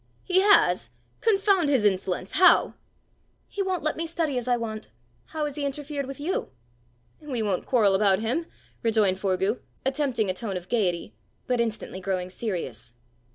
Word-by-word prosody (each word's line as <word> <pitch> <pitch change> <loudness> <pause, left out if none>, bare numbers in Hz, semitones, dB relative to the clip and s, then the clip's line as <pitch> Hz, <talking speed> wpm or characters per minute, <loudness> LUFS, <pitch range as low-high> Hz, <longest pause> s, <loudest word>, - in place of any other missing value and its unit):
"He 370 -1 +3
has! 405 0 +4 0.3
Confound 390 -6 +3
his 260 -7 +2
insolence! 190 -1 0
How?" 365 +3 +5 0.7
"He 405 - -4
won't 375 -2 -1
let 310 - 0
me 330 +1 -3
study 320 -4 -1
as 245 -1 -3
I 245 -1 +3
want. 220 -2 -5 0.4
How 310 -2 -3
has 295 0 -5
he 295 - -2
interfered 280 0 -3
with 275 +1 -8
you?" 330 +6 -2 0.7
"We 260 -7 -3
won't 195 -4 -1
quarrel 215 -6 +4
about 195 -1 +4
him," 250 - -1 0.3
rejoined 215 -5 +2
Forgue, 190 +3 0 0.3
attempting 265 -5 0
a 185 - 0
tone 195 0 -4
of 180 0 -9
gaiety, 180 - 0 0.3
but 250 -2 +1
instantly 220 -4 -4
growing 185 -1 -2
serious. 165 - -5
235 Hz, 160 wpm, -26 LUFS, 195-300 Hz, 0.7 s, How